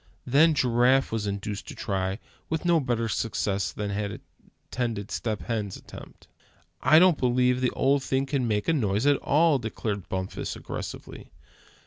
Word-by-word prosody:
Then 150 +5 +4
Giraffe 125 +1 +3
was 110 -2 -2
induced 100 0 -4
to - - -8
try, 95 -1 -2
and 100 - -8 0.3
with 160 +2 -2
no 170 -1 +4
better 120 -4 -1
success 100 -5 -1
than 105 -1 -4
had 100 0 -3 0.5
attended 115 -5 -2
Step 110 -3 -3
Hen's 105 -5 -3
attempt. - - -13 0.5
"I 155 - +6
don't 175 -2 +5
believe 125 0 +2
the 125 - +2
old 140 +1 +2
thing 135 0 0
can 135 -3 -1
make 105 -2 -1
a 165 - +3
noise 110 -5 0
at 145 -1 +4
all!" 155 -1 +3
declared 105 -3 -4
Bumpus, 95 0 -4
aggressively. - - -8
120 Hz, 160 wpm, -26 LUFS, 105-135 Hz, 0.5 s, I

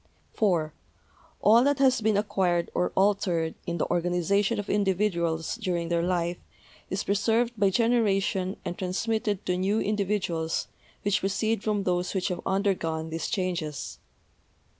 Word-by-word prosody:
(4) 170 -8 +1 0.7
All 225 +3 +6
that 285 0 +2
has 260 -3 +3
been 215 -1 +2
acquired 190 -4 0
or 180 - 0
altered 185 -5 +2
in 170 0 -2
the - - 0
or 175 - 0
ganization 195 +5 +1
of 205 -1 -4
individuals 185 -4 0
during 175 -6 -2
their 170 -1 +1
life 175 0 0 0.5
is 190 +2 -2
preserved 225 +4 +1
by 200 -2 +3
generation 200 -4 +1
and 175 - -3
transmitted 205 +2 -1
to 180 - +1
new 195 +4 +1
individuals 195 -6 -1 0.3
which 205 0 +2
proceed 200 +2 0
from 210 -2 0
those 180 0 -1
which 185 - 0
have 180 - -3
undergone 170 -5 0
these 165 0 -3
changes. 175 - -3
190 Hz, 140 wpm, -27 LUFS, 175-210 Hz, 0.7 s, All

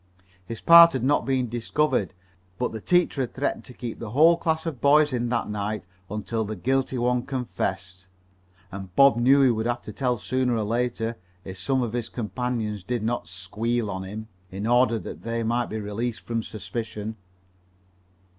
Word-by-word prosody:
His 115 +4 -7
part 170 0 +9
had 130 - -2
not 145 +1 +2
been 130 -2 +1
discovered, 115 - 0 0.4
but 125 - -1
the 110 - -6
teacher 175 - +2
had 125 - -4
threatened 140 +2 -2
to 125 - -11
keep 120 -2 -6
the 115 - -6
whole 155 +9 +6
class 160 -1 -1
of 155 -7 -4
boys 150 0 +5
in 120 -1 -1
that 120 -1 0
night 105 -2 -3 0.2
until 110 +2 -2
the 110 +1 -4
guilty 130 +6 0
one 125 0 +1
confessed, 95 -8 -4 0.6
and 95 -2 -8
Bob 140 0 +7
knew 135 +4 +5
he 130 - +5
would 110 0 -1
have 120 0 -2
to 105 - -8
tell 125 0 0
sooner 125 +5 0
or 110 - 0
later, 115 +1 -1 0.3
if 95 0 -8
some 130 +7 0
of 115 -2 -3
his 120 -2 -2
companions 115 -2 -3
did 120 +1 -2
not 115 -5 -2
"squeal" 105 +5 -2
on 95 0 -4
him, 105 +3 -7 0.2
in 95 +3 -5
order 120 0 +3
that - - -8
they 115 0 -2
might 120 +2 0
be 110 - -4
released 110 +3 -3
from 115 -1 -2
suspicion. 110 -1 -5
115 Hz, 185 wpm, -25 LUFS, 105-130 Hz, 0.6 s, part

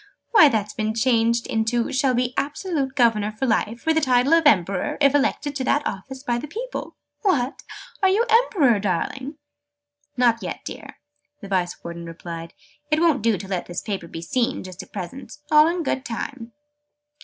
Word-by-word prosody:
Why, 320 -11 +8
that's 210 -4 -1
been 215 0 -2
changed 230 0 +2
into 225 +1 0
'shall 260 -1 +2
be 250 +1 0
absolute 285 -3 -2
governor 225 -5 +3
for 215 +5 -3
life, 230 -1 -1
with 320 - +3
the - - +3
title 255 +1 +3
of 330 -2 +5
Emperor, 215 - +2
if 280 -1 +4
elected 290 0 0
to 265 - -2
that 290 +2 +1
office 265 +7 -5
by 240 -3 0
the 300 - -6
people.' 485 - -6 0.3
What! 285 - 0 0.4
Are 385 - +5
you 425 +5 +3
Emperor, 395 - +4
darling?" 235 - -2 0.8
"Not 235 -2 +3
yet, - - -5
dear," - - -8 0.4
the 200 - -8
Vice 185 -2 -2
Warden 170 0 -7
replied. 165 0 -8 0.3
"It 305 0 +2
won't 320 -7 +3
do 225 -1 +2
to 195 - -8
let 185 -2 -3
this 175 - -5
paper 195 -5 -4
be 165 0 -7
seen, 240 +8 -1
just 185 -1 -8
at - - -15
present. 215 +8 -7
All 305 +1 +7
in 340 0 -1
good 265 -2 -1
time." 240 -1 -6
245 Hz, 180 wpm, -23 LUFS, 210-290 Hz, 0.8 s, Why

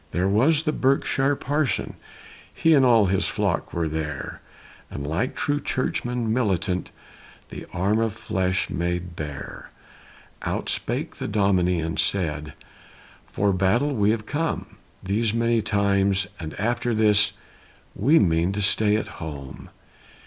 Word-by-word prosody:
There 90 +3 +1
was 145 +11 +3
a - - +4
Berkshire 135 0 +1
parson 145 +1 -1 0.6
he 165 - +3
And 140 -3 +5
all 115 -4 +5
his 95 0 +1
flock - - -1
were 85 -1 -1
there, 75 -2 -4 0.5
And 70 - -6
like 85 - -1
true 145 0 0
churchmen 120 -4 -1
militant 95 -6 0 0.6
The - - -8
arm 100 +5 +1
of 115 -2 0
flesh 95 -4 -1
made 90 0 -2
bare. 75 -3 -7 0.7
Out - - -3
spake - - -2
the - - -4
Dominie 95 -4 +2
and 80 +1 -3
said, 75 -6 -1 0.7
"For 100 0 +1
battle 95 +10 +2
have 140 - -3
we 105 +3 +3
come 145 +9 -3 0.3
These 105 +3 0
many 115 0 +2
times, 100 -2 +2
and 80 -2 -7
after 120 +2 0
this 105 -1 +4 0.6
We 140 +11 +4
mean 85 - +2
to 105 - -2
stay 105 0 +3
at 110 - -1
home." 70 -4 -8
100 Hz, 135 wpm, -24 LUFS, 90-120 Hz, 0.7 s, And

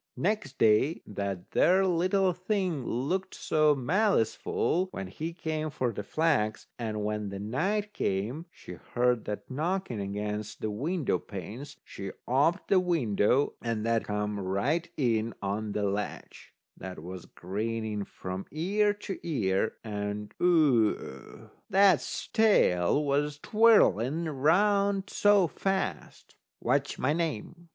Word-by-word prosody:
Next 180 -9 -1
day 115 +8 +3
that 100 -3 -5
there 190 +2 +4
little 185 +1 +2
thing 180 - -1
looked 180 +11 -2
so 155 -1 +2
maliceful 180 - +1
when 95 - -6
he 155 - -5
came 155 -2 -3
for 130 -4 -1
the 105 - -4
flax. 110 -3 0
And 110 -3 -3
when 105 -1 -2 0.2
night 205 - -1
came, 115 - -2
she - - -11 0.2
heard 125 -1 +2
that 105 +5 -6
knocking 160 - -2
against 105 +1 -4
the 110 - -2
window 150 - -1
panes. 110 - -8
She 95 -1 -7
oped 150 +9 +2
the 195 - +5
window, 140 - +2
and 115 -2 -2
that 115 -1 +1
come 105 0 -2
right 125 - -1
in 115 -4 0
on 105 +1 -3
the 105 - -1
ledge. 100 +1 -4 0.2
That 95 0 -8
was 90 0 -8
grinning 110 +2 -3
from 95 0 -7
ear 205 +6 +1
to 200 -1 -6
ear, 110 - 0
and 105 -1 -4
Oo! 130 - +1 0.2
that's 195 -4 +3
tail 150 - +3
was 145 +1 0
twirling 170 - +4
round 195 +7 +2
so 205 -2 +4
fast. 190 +3 -3 0.2
"What's 140 +3 0
my 130 +4 +1
name?" 165 +1 -4
135 Hz, 125 wpm, -29 LUFS, 105-175 Hz, 0.2 s, the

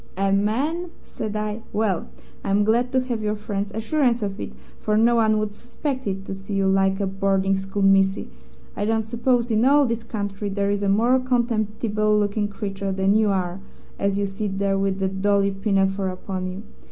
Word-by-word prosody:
"'A 195 0 +1
man!' 275 - 0
said 215 -1 -5
I. 210 +1 -2
'Well, 205 -5 0 0.3
I'm 200 +1 +2
glad 235 +4 +2
to 260 - +3
have 245 -3 -3
your 210 0 -1
friend's 205 -1 -4
assurance 240 +1 +1
of 200 0 -3
it, - - -5 0.3
for 210 0 +1
no 235 +2 +4
one 220 -1 +3
would 215 -1 -2
suspect 260 +3 -4
it 195 0 -3
to - - -5
see 195 +1 -6
you 195 0 +2
like 195 0 +2
a 200 - +1
boarding 195 0 +1
school 195 +1 -3
missy. 195 0 +3 0.5
I 205 - -1
don't 225 0 +1
suppose 235 +1 +1
in 220 +1 +3
all 285 +2 +5
this 230 -2 -2
country 205 -2 -4
there 200 0 0
is 205 0 -1
a 200 - +1
more 235 +6 +4
contemptible 215 -4 0
looking 205 0 0
creature 200 -1 -4
than 190 +1 +2
you 215 0 +3
are 185 -1 -1 0.4
as 200 0 +1
you 200 - +1
sit 195 0 -3
there 195 0 +1
with 195 -1 0
that 190 0 -1
Dolly 200 0 +3
pinafore 195 -1 0
upon 185 0 -4
you.' 185 +3 -6
205 Hz, 195 wpm, -23 LUFS, 195-225 Hz, 0.5 s, all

